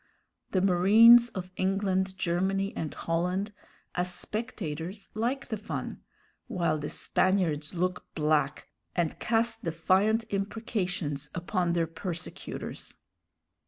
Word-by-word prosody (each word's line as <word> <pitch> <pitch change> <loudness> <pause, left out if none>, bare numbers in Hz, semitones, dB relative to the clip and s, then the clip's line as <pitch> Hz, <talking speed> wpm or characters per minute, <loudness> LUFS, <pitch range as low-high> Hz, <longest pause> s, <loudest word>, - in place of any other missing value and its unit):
The 185 - +1
marines 220 +6 +7
of 185 -4 -6
England, 190 0 0
Germany, 190 +3 0
and 155 - -3
Holland, 180 +5 -1 0.4
as 180 0 0
spectators, 190 -3 -5
like 245 +5 -2
the 220 - -2
fun, 210 +2 -5 0.5
while 165 -4 0
the 150 - -4
Spaniards 180 -5 +1
look 180 +1 -1
black 150 -2 +1 0.3
and 170 -3 0
cast 225 0 +1
defiant 190 +7 +2
imprecations 195 - -2
upon 175 0 0
their 170 -1 +2
persecutors. 170 +1 -6
185 Hz, 105 wpm, -29 LUFS, 170-205 Hz, 0.5 s, marines